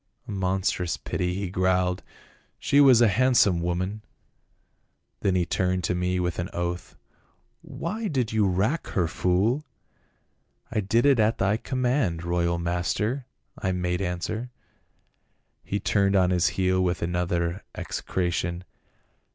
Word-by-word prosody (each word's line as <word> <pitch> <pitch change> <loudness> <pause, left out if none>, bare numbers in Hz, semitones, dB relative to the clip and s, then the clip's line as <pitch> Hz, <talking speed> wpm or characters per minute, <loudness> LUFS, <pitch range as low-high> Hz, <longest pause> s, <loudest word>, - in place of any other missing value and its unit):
'A - - -6
monstrous 95 -2 -1
pity,' 90 0 -2
he 95 -2 -3
grunted. 90 -1 +1 0.3
' - - -35
She 140 - +3
was 130 -4 +7
a 120 - +7
handsome 105 -5 +3
woman.' 90 +5 -2 1.2
Then 95 -2 +1
he 90 -1 +2
turned 90 +1 0
to - - 0
me 90 +1 0
with 90 -1 -2
an 85 - -3
oath, 85 0 -4 0.3
' - - -43
Why 215 +6 -4
did 130 - -1
you 110 -2 +3
rack 100 - 0
her, 90 -3 +3
fool 100 - +1 0.3
?' - - -42
' - - -42
I 110 - +1
did 110 +5 +2
it 140 -4 +5
at 110 +1 +3
thy 100 +2 +2
command, 125 - 0
royal 85 0 0
master,' 90 +9 -1 0.3
I 95 -1 -1
made 90 0 -1
answer. 95 +6 -3 1.1
He 100 - -2
turned 100 0 +2
on 95 -1 +4
his 90 -1 +3
heel 95 0 +2
with 90 -1 -1
another 85 +1 -1
execration. 85 -1 -2
95 Hz, 145 wpm, -26 LUFS, 90-110 Hz, 1.2 s, was